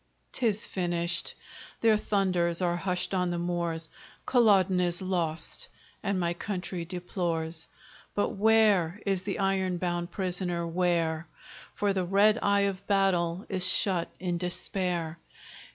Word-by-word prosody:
'Tis 215 -4 +1
finished. 170 -2 -2 0.5
Their 225 -1 +5
thunders 185 -5 +1
are 175 -2 +1
hushed 180 +1 -2
on 180 -1 +1
the 175 - -1
moors: 170 -2 -2 0.3
Culloden 200 -7 +4
is 175 -1 0
lost, 175 -4 -2 0.3
and 200 -2 0
my 170 -1 0
country 180 -1 -4
deplores. 170 -2 -3 0.5
But 205 - +1
where 210 -4 +3
is 195 -2 +1
the 200 +1 -3
iron 190 -2 +1
bound 175 -1 -2
prisoner? 180 -3 -2
where? 170 -2 0 0.5
For 205 -1 +1
the 190 -1 0
red 205 +5 +4
eye 200 0 +3
of 200 0 -2
battle 190 -3 +2
is 185 -2 -2
shut 185 -4 +1
in 175 -2 -2
despair. 175 -2 -2
180 Hz, 130 wpm, -29 LUFS, 170-195 Hz, 0.5 s, Their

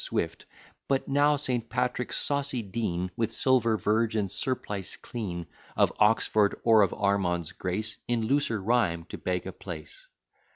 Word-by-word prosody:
Swift, - - -2 0.4
But 135 -1 0
now 145 +2 +4
St. 125 -5 -1
Patrick's 125 0 -1
saucy 140 -4 0
dean, 95 -4 -2
With 115 -1 -1
silver 115 -2 +3
verge, 110 +3 +1
and 100 -4 0
surplice 105 -7 -3
clean, 90 -8 -5 0.3
Of - - +3
Oxford, 105 -1 +3
or 110 -2 +6
of 100 - +3
Ormond's 90 -4 0
grace, 100 +5 -3
In 120 -2 0
looser 120 -2 +1
rhyme 95 -6 +1
to - - -7
beg 90 -1 -2
a - - -4
place. - - -9
110 Hz, 150 wpm, -28 LUFS, 95-125 Hz, 0.4 s, or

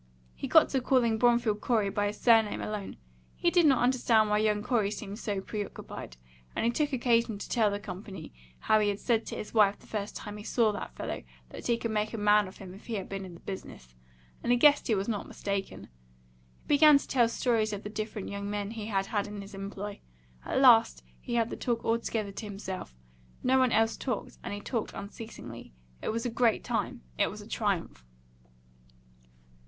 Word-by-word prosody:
He - - -5
got - - +6
to 265 - 0
calling 240 -3 +2
Bromfield 235 -3 +3
Corey 215 -5 +1
by 205 +1 0
his 205 - -5
surname 225 -3 +4
alone. 210 -2 -5 0.4
He 345 - +1
did 345 -3 +5
not 265 -4 +4
understand 235 -4 +3
why 210 - +3
young 210 -1 +1
Corey 220 -5 +1
seemed 205 0 -6
so 200 -4 -2
preoccupied, 200 - -7 0.4
and - - 0
he 235 - +3
took 295 +4 0
occasion 235 -4 +2
to - - -7
tell 225 -4 +2
the 200 0 -3
company 190 -3 -8 0.3
how 215 - +4
he 210 -1 +2
had 200 0 -2
said 230 -2 +1
to - - -5
his 210 - -7
wife 205 -3 +4
the - - -20
first 205 -2 -4
time 210 -1 -7
he 210 - -9
saw 225 -1 +2
that 205 - -6
fellow - - -4 0.3
that - - -7
he 235 - +2
could 230 -1 -3
make 215 +1 -1
a - - -4
man 210 -1 +4
of 185 - -12
him 185 -2 -10
if 195 - -14
he 230 - -2
had 195 -1 -5
him 195 0 -3
in 180 -2 -10
the - - -13
business; 60 - -8 0.5
and 240 - 0
he 245 - +5
guessed 290 +3 +5
he 220 - +3
was 195 0 -2
not 215 -3 -2
mistaken. 200 -1 -4 0.8
He - - -26
began 295 0 +7
to - - -6
tell 240 -3 +3
stories 230 -3 +1
of 205 -1 -5
the 210 - -5
different 215 -2 -4
young 200 0 -4
men 205 0 -3
he 220 -2 -6
had 195 -3 0
had 205 -1 -1
in 205 0 -7
his 200 +1 -9
employ. 200 +1 -6 0.4
At - - -1
last 235 -4 +6 0.2
he 240 - -4
had 230 -1 +1
the - - -3
talk 235 -2 -2
altogether 225 -2 -1
to 205 +3 -7
himself; 190 - -6 0.5
no 260 +1 +4
one 255 -2 +3
else 225 0 +2
talked, 250 -5 -4
and - - -5
he 205 0 -5
talked 230 0 -3
unceasingly. 200 - -9 0.3
It - - -3
was 230 +2 -2
a 245 - -1
great 230 -2 +2
time; - - -2 0.2
it - - +3
was - - -8
a - - -12
triumph. - - -2
215 Hz, 215 wpm, -29 LUFS, 200-235 Hz, 0.8 s, began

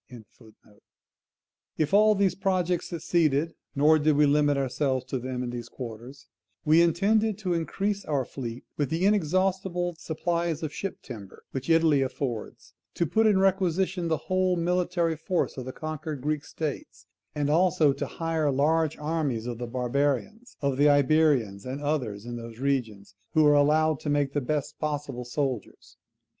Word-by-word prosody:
] - - -65 1.7
If 155 +3 0
all 215 +1 +6
these 195 -2 +2
projects 185 -2 0
succeeded 165 -2 +1 0.2
(nor 155 +3 +5
did 155 0 +3
we 150 +1 +5
limit 145 0 +3
ourselves 135 -1 -1
to 130 - -2
them 125 0 -4
in 120 - -4
these 120 -1 -6
quarters), 125 +2 -9 0.4
we 155 +2 +6
intended 205 +5 +2
to 190 -4 -2
increase 195 +4 -2
our 140 -4 0
fleet 120 -2 -7
with 145 -3 0
the 165 +3 0
inexhaustible 185 -1 +1
supplies 170 0 -2
of 150 -1 -3
ship 195 +4 -5
timber 105 -7 -10
which 135 +3 -5
Italy 165 -4 +4
affords, 130 -4 -4 0.2
to 170 - +1
put 220 +7 +2
in 205 -3 +4
requisition 190 -1 +1
the 160 -1 +1
whole 185 -1 +1
military 175 -1 0
force 170 +3 -1
of 130 - -6
the 130 - -5
conquered 155 -1 -5
Greek 150 +1 -2
states, 155 -3 -6 0.3
and 145 -1 0
also 160 -3 +3
to - - -4
hire 165 -2 -1
large 155 +3 +1
armies 150 -7 -2
of 120 -1 -5
the 120 - -4
barbarians; 140 - -2
of 140 -2 0
the 145 +1 +5
Iberians, 145 -8 +3
and 130 +2 -5
others 130 -9 -2
in 120 0 -5
those 115 -1 -9
regions, 115 -8 -2 0.2
who 155 -1 +5
are 150 - +6
allowed 155 +1 +3
to 150 - -4
make 145 -1 +1
the 145 - 0
best 145 +2 -3
possible 145 -5 -3
soldiers. 130 -3 -4
150 Hz, 160 wpm, -27 LUFS, 135-170 Hz, 1.7 s, all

